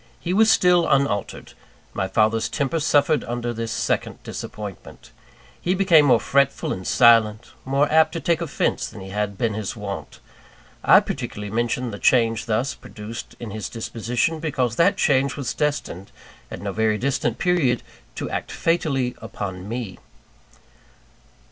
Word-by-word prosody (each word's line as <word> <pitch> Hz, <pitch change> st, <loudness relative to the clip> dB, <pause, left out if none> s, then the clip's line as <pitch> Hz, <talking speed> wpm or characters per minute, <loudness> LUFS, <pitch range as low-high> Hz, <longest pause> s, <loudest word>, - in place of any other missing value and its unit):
He 175 Hz, -, -2 dB
was 220 Hz, +3 st, +5 dB
still 180 Hz, -4 st, +4 dB
unaltered. 135 Hz, -8 st, 0 dB, 0.4 s
My 95 Hz, -, -1 dB
father's 110 Hz, +3 st, +1 dB
temper 145 Hz, +2 st, -1 dB
suffered 150 Hz, 0 st, +2 dB
under 120 Hz, 0 st, -3 dB
this 115 Hz, 0 st, -4 dB
second -, -, -1 dB
disappointment. 105 Hz, -3 st, -8 dB, 0.5 s
He 180 Hz, +2 st, 0 dB
became 180 Hz, -6 st, +5 dB
more 125 Hz, -4 st, +5 dB
fretful 140 Hz, +4 st, +1 dB
and 95 Hz, -, -7 dB
silent; 115 Hz, -2 st, +4 dB
more 140 Hz, +2 st, +2 dB
apt 160 Hz, 0 st, +4 dB
to 165 Hz, -, -3 dB
take 165 Hz, +2 st, 0 dB
offence 170 Hz, -, -1 dB
than 95 Hz, -, -10 dB
had 100 Hz, 0 st, -3 dB
been 115 Hz, 0 st, 0 dB
his 105 Hz, +1 st, -4 dB
wont. 100 Hz, -3 st, -7 dB, 0.6 s
I -, -, +7 dB
particularly 105 Hz, -1 st, -5 dB
mention 120 Hz, +1 st, -1 dB
the 100 Hz, -, -7 dB
change 115 Hz, -2 st, +2 dB
thus 115 Hz, +5 st, 0 dB
produced 115 Hz, -2 st, -9 dB
in 115 Hz, -3 st, -7 dB
his 105 Hz, -2 st, -5 dB
disposition, 120 Hz, +6 st, -2 dB
because 130 Hz, -7 st, -1 dB
that 170 Hz, -, +4 dB
change 140 Hz, -2 st, +2 dB
was 140 Hz, -4 st, -3 dB
destined, 145 Hz, -, -3 dB, 0.4 s
at -, -, -8 dB
no 100 Hz, -, -2 dB
very 110 Hz, +1 st, +1 dB
distant 125 Hz, -2 st, -1 dB
period, 155 Hz, -9 st, +1 dB, 0.3 s
to -, -, -4 dB
act -, -, -4 dB
fatally 140 Hz, -7 st, 0 dB
upon 95 Hz, -1 st, -6 dB
me. 115 Hz, -6 st, -5 dB
120 Hz, 150 wpm, -23 LUFS, 110-145 Hz, 0.6 s, I